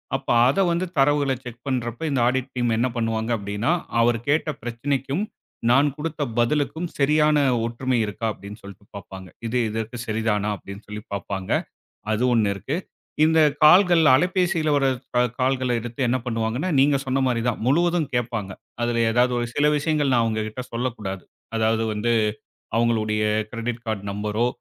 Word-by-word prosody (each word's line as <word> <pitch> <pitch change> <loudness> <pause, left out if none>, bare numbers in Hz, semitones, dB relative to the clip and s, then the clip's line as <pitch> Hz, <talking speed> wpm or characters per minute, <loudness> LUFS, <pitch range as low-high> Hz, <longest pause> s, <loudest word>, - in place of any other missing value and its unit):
அப்ப - - -5 0.2
அதை 140 +9 +2
வந்து 170 +2 0
தரவுகளை 140 -1 +3
செக் 120 -1 -10
பண்றப்ப 120 -1 -2
இந்த 135 - +1
ஆடிட் 130 +1 0
டீம் 120 -2 0
என்ன 120 +3 +2
பண்ணுவாங்க 115 -1 -1
அப்டின்னா, 100 +7 -2 0.3
அவர் 115 0 +3
கேட்ட 155 +2 +2
பிரச்சனைக்கும் 135 - -2 0.5
நான் 135 +4 +5
குடுத்த 155 0 -4 0.2
பதிலுக்கும் 150 +7 0
சரியான 150 +1 +4 0.3
ஒற்றுமை 125 +2 -1
இருக்கா 105 +2 -5
அப்டின்னு 105 +2 -10
சொல்லிட்டு 100 0 -13
பாப்பாங்க. 95 -1 -9 0.2
இது 120 +2 -1
இதற்குச் 115 +2 -5
சரிதானா 110 -1 0
அப்டின்னு 100 +1 -11
சொல்லிப் 105 0 -8
பாப்பாங்க. 100 -1 -4 0.6
அது 110 +3 0
ஒண்ணு 110 -4 +2
இருக்கு. 100 +9 -4 0.5
இந்தக் 155 -2 +4
கால்கள், 175 +2 +7
அலைபேசியில 175 +1 +2
வர்ற 140 -1 +2 0.3
க - - +3 0.2
கால்களை 130 -1 +1
எடுத்து 120 +3 -6
என்ன 125 +2 +2
பண்ணுவாங்கன்னா, 115 +7 -1
நீங்கச் 140 0 +3
சொன்ன 135 0 0
மாரி 120 -2 0
தான். 120 - -1
முழுவதும் 170 +2 +2
கேட்பாங்க. 115 -4 -2 0.3
அதுல 120 0 +1
ஏதாவது 125 +2 +3
ஒரு 120 - -1
சில 145 - +2
விஷயங்கள் 150 -2 +1
நான் 120 -2 +4
அவங்ககிட்ட 110 +1 -2
சொல்லக் 120 +1 -2
கூடாது. 95 -3 -5 0.3
அதாவது 110 0 +1
வந்து, 105 +3 0 0.7
அவங்களுடைய 110 -2 +1 0.3
கிரெடிட் 120 0 -4
கார்ட் 110 -3 -2
நம்பரோ 105 +3 -1
120 Hz, 155 wpm, -23 LUFS, 110-140 Hz, 0.7 s, கால்கள்